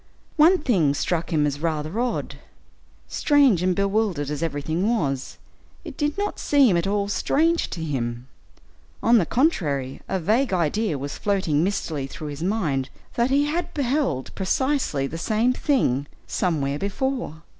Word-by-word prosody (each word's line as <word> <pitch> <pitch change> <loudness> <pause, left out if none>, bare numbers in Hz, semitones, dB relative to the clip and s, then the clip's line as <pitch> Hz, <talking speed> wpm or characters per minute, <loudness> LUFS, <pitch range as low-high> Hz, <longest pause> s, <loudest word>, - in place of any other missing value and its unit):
One 335 +4 +6
thing 185 - +2
struck 170 +4 -1
him 150 -2 +2
as 145 -1 -2
rather 160 +4 -2
odd; 245 0 -2 0.7
strange 280 - +3
and 180 0 +1
bewildered 200 -7 0
as 150 - -3
everything 160 +5 -1
was, 140 - -1 0.5
it - - -7
did 295 +2 -1
not 410 +1 -2
seem 270 -10 +4
at 170 +2 0
all 200 0 0
strange 325 +10 +1
to 165 - -5
him, 120 -5 -3 0.8
on 230 +1 +6
the 170 - 0
contrary, 150 - 0
a 190 - 0
vague 220 +7 +1
idea 180 +1 0
was 140 +1 -6
floating 185 -7 +1
mistily 160 -7 -2
through 150 +2 -7
his 145 +1 -7
mind 165 -9 -1 0.2
that 240 +2 +1
he 280 +2 +3
had 325 +4 -2
beheld 265 - -1
precisely 205 - 0
the 165 +4 -5
same 225 +7 +1
thing 145 - +1 0.2
somewhere 145 -6 -1
before. 200 - -3
185 Hz, 150 wpm, -24 LUFS, 150-250 Hz, 0.8 s, One